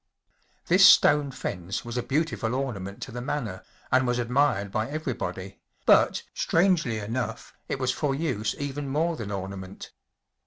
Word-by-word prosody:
This - - +5
stone 145 -1 +7
fence 95 -7 -5
was 120 0 -6
a 125 - 0
beautiful 145 -4 -1
orna¬ 125 -4 -2
ment 100 +1 -7
to - - -8
the 120 +1 -5
manor 120 -8 -4 0.3
and 130 0 +3
was 120 0 +1
admired 120 -5 +1
by 110 +3 -1
everybody, 105 - -4 0.3
but, - - +4
strangely 165 - +2
enough, 115 +4 -4 0.2
it - - -1
was 130 -1 0
for 135 0 -1
use 130 -9 -1
even 145 0 -4
more 160 +4 0
than 110 -8 -6
ornament. 95 -1 -6
125 Hz, 155 wpm, -26 LUFS, 100-145 Hz, 0.3 s, stone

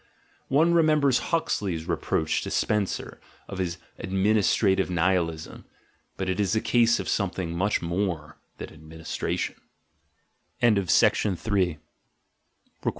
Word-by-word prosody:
One 160 +5 +3
remembers 150 -6 +4
Huxley's 95 - -1
reproach 80 -2 0
to - - -5
Spencer 105 -3 -1 0.3
of 95 - -7
his 90 -2 -2 0.2
"administrative 95 0 +2
Ni 90 -2 -2
hilism": 80 -3 -3 0.5
but 95 - -3
it 95 +1 -1
is 100 0 +1
a - - +3
case 120 +1 +3
of - - -4
something 90 -4 -2
much 100 +1 0
more 85 -3 -3 0.2
than - - -8
"administration." 80 +1 -4
95 Hz, 100 wpm, -26 LUFS, 85-110 Hz, 0.5 s, remembers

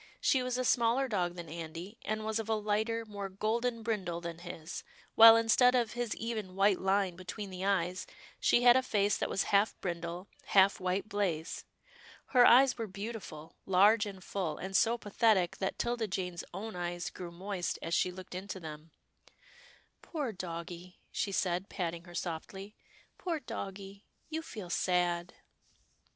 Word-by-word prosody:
She 265 - +3
was 250 0 -1
a 255 - -1
smaller 240 +3 +3
dog 180 -6 -1
than 170 -1 -7
Andy, 165 +6 -7
and 215 0 -2
was 220 0 -1
of 225 0 -5
a 220 - +3
lighter, 215 +2 -1
more 200 -2 -6
golden 225 +4 -1
brindle 195 -7 -2
than 170 -1 -6
his, 170 -2 -7 0.3
while 225 0 +10
instead 240 +2 +5
of 235 -3 +1
his 240 -3 -2
even 215 -5 -4
white 195 0 +3
line 190 -1 +1
between 185 +3 -7
the 185 0 -6
eyes, 185 -2 0 0.3
she 240 - +3
had 245 0 +8
a 260 - +5
face 205 -5 +1
that - - -2
was 195 - +1
half 200 +2 +3
brindle, 175 +1 -4 0.2
half 195 0 +4
white 185 +2 -1
blaze. 185 -6 -2 0.7
Her 250 -2 +8
eyes 255 0 +6
were 225 - -2
beautiful 200 -6 -7
— - - -46
large 210 +3 +6
and 190 -2 -9
full, 180 -6 -3
and 190 +1 -5
so 230 +3 +4
pa 210 -3 -10
thetic 200 -6 +3
that 190 - -2
'Tilda 235 -2 -1
Jane's 180 -2 -3
own 205 +3 -6
eyes 175 0 -3
grew 180 -2 -7
moist 185 +1 -3
as 165 - -3
she 180 - +3
looked 185 0 -10
into 190 +1 -5
them. 155 -1 -9 0.6
" - - -26
Poor 290 -8 -3
doggie," 175 -1 -7
she 200 - -1
said, 185 0 -1
patting 170 -2 -4
her 175 -1 -12
softly, 190 +4 -5 0.2
" - - -30
poor 340 -4 -2
doggie 195 -5 -7
— - - -39
you 320 +1 -2
feel 210 - -8
sad." 175 -1 0
195 Hz, 175 wpm, -32 LUFS, 180-225 Hz, 0.7 s, while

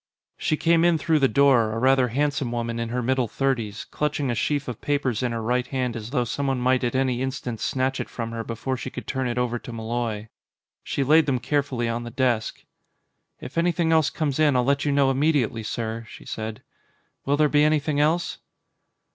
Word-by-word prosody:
She 155 - 0
came 165 +1 +3
in 170 -1 +4
through 155 +1 +2
the 135 - +4
door, 130 -6 +4
a - - -3
rather 130 +1 +4
handsome 140 0 -1
woman 115 -1 -2
in 115 0 -2
her 125 +1 -2
middle 130 0 +1
thirties, 115 -4 -2
clutching 145 -3 -1
a - - 0
sheaf 145 +4 -1
of 125 -4 -6
papers 140 -6 0
in 125 -2 0
her 115 -1 -3
right 125 +2 0
hand 125 -3 -2
as 110 -1 -6
though 125 -2 +1
someone 135 +2 -1
might 130 +1 +2
at 120 +1 -1
any 130 -2 +1
instant 125 -3 -3
snatch 135 +2 -1
it - - -4
from 115 -1 -5
her 115 0 -4
before 115 +4 -3
she 130 - -5
could - - -8
turn 130 -1 -2
it 120 0 -3
over 120 -1 0
to 120 - -9
Malloy. 115 -1 -3 0.5
She 140 - -1
laid 155 +4 +5
them 135 -2 +2
carefully 130 -1 -1
on 115 +1 -2
the 120 - -6
desk. 120 -3 -1 0.8
"If 130 +6 -4
anything 170 -1 +1
else 160 -2 +4
comes 150 -3 -2
in, 150 -3 +4
I'll 125 - +3
let 140 +3 +1
you 145 - +2
know 140 -1 +3
immediately, 135 -5 +1
sir," 110 +1 -4
she - - -12
said. 110 -1 -5 0.6
"Will 140 +1 +2
there 155 0 +4
be 145 0 +3
anything 150 -1 +2
else?" 165 +4 +1
130 Hz, 210 wpm, -24 LUFS, 120-145 Hz, 0.8 s, laid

